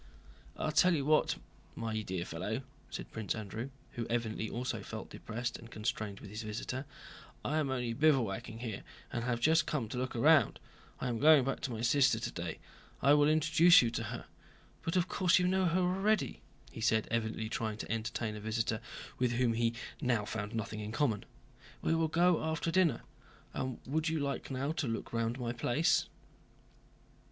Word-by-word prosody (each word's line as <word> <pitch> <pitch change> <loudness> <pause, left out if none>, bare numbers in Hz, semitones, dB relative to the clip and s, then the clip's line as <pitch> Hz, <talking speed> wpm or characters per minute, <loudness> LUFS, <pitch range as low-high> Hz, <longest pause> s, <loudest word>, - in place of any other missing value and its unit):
"I'll 155 - -1
tell 165 +4 +5
you 140 -3 -1
what, 155 +1 +3 0.4
my 110 -1 -2
dear 90 -4 -3
fellow," 105 +11 -3 0.3
said - - -7
Prince 110 -2 -2
Andrew, 110 +4 -5 0.2
who 120 -1 -4
evidently 110 -2 -1
also 125 +2 -3
felt - - -7
depressed 120 +2 -4
and 115 - -12
constrained 110 -2 -3
with 100 - -10
his 105 +2 -5
visitor, 115 +5 -4 0.6
"I 155 +2 +1
am 145 -3 0
only 125 -3 -1
bivouacking 115 -6 +1
here 110 -5 -4 0.3
and 120 - -1
have 120 -1 0
just 155 +4 +4
come 130 -7 -1
to 125 - -3
look 130 0 -3
round. 145 +5 +5 0.4
I - - -2
am 120 -2 -1
going 150 -1 +7
back 135 - -1
to 130 - -3
my 115 -1 -4
sister 130 -1 +4
today. 85 -7 -4 0.5
I 140 +1 +7
will 145 0 +5
introduce 155 +1 +6
you 115 - 0
to 115 -1 -3
her. - - -6 0.6
But 165 - -2
of 180 -1 +3
course 185 -2 +3
you 180 -1 +3
know 190 0 +2
her 180 +2 +2
already," 195 +4 +1 0.3
he - - -8
said, 110 -1 +2
evidently 110 -1 -1
trying 110 -2 -2
to - - -5
entertain 110 0 -2
a - - -6
visitor 110 +1 -1 0.4
with 125 -1 +2
whom 120 -1 +2
he 115 0 +1 0.3
now 120 -6 +1
found 105 0 -4
nothing 110 -1 -3
in 105 0 -5
common. 120 -5 0 0.6
"We - - +2
will 165 0 +2
go 170 +1 +3
after 160 +1 -1
dinner. 180 -3 +3 0.5
And 130 -1 -3
would 155 +4 0
you 160 -1 0
now 145 - 0
like 140 +2 -3
to 140 - 0
look 115 0 -4
round 115 +2 -1
my 120 -1 -2
place?" 125 - +2
120 Hz, 185 wpm, -33 LUFS, 110-155 Hz, 0.6 s, going